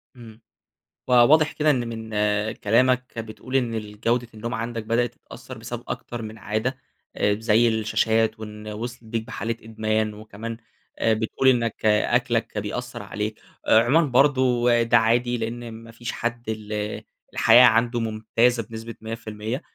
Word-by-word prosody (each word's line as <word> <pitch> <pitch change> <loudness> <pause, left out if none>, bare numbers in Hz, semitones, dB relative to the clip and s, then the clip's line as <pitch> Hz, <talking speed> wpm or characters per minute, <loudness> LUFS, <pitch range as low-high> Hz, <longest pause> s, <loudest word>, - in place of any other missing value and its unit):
إمم. 115 -2 -13 0.7
فواضح 135 +5 +5
كده 155 0 +1
إن 120 -4 -1
من 110 -1 -6 0.4
كلامك 125 +4 +2
كده 115 - -6
بتقول 125 +4 -8
إن 120 -3 +1
الجودة 110 +3 -2
النوم 115 +2 -5
عندك 115 0 -3
بدأت 115 +1 0
تتأثَّر - - -12
بسبب - - -7
أكتر 120 -1 -5
من 110 0 -7
عادة، 110 +6 -2 0.4
آآ، 105 - +2
زي 115 +1 +3
الشاشات 110 0 +1
وإن 105 0 -9
وصلت 120 +3 -6
بيك 110 0 -3
بحالة 115 0 -3
إدمان، 110 -1 -1
وكمان 110 +2 -7 0.4
آآ، 110 - +3
بتقول 110 +4 0
إنك 115 -3 0
أكلك 115 +1 +1
بيأثَّر 115 +2 -4
عليك. 105 +1 -4 0.3
عمومًا 130 +9 +5
برضه 125 -3 +3
ده 115 0 +4
عادي؛ 115 +2 +2
لأن 115 +1 -5
ما 115 +1 -11
فيش 120 0 -6
حد 120 -1 -4
ال 105 -1 -4 0.3
الحياة 125 +1 +7
عنده 120 +1 +3
ممتازة 115 +2 +1
بنسبة 115 +1 -8
100%، 110 +2 -5
115 Hz, 145 wpm, -24 LUFS, 110-120 Hz, 0.7 s, الحياة